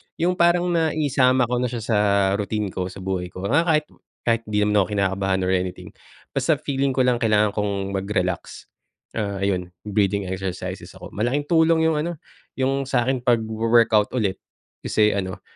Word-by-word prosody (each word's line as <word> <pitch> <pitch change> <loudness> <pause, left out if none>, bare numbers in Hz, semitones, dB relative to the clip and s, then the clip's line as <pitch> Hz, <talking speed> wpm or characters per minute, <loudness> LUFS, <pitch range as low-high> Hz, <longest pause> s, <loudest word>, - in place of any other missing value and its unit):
yung 180 +2 0
parang 175 +1 +3
naisama 145 -6 +2
ko 120 +1 0
na 125 - 0
siya 120 -2 -5
sa 110 -2 +1 0.4
routine 105 -1 -2
ko, 90 0 -3
sa 95 0 -9
buhay 95 -1 -2
ko, 90 +1 -9
mga 165 +5 +3
kahit 155 -2 +3 0.4
kahit 115 -1 +1
di 105 -1 0
naman 105 0 +2
ako 95 - +3
kinakabahan 95 -1 0
or 90 - 0
anything, 90 -1 -2 0.4
basta - - +1
feeling 135 -1 -1
ko 130 - +3
lang 125 -1 +2
kailangan 105 -2 +3
kong 100 -1 -2
mag-relax, 95 -2 -2 0.6
ah, 100 -2 -3
ayun, 90 -2 0 0.2
breathing 100 -1 0
exercises 95 0 -5
ako, - - -10
malaking 125 +7 -1
tulong 160 0 +4
yung 160 -2 +2
ano, 170 +3 -2 0.4
yung 135 +1 0
sakin, 130 0 +1
pagwo-workout 115 -2 +3
ulit, 105 -6 0 0.5
kasi, 105 -1 +3
ano, 95 -2 -4
110 Hz, 165 wpm, -23 LUFS, 100-135 Hz, 0.6 s, tulong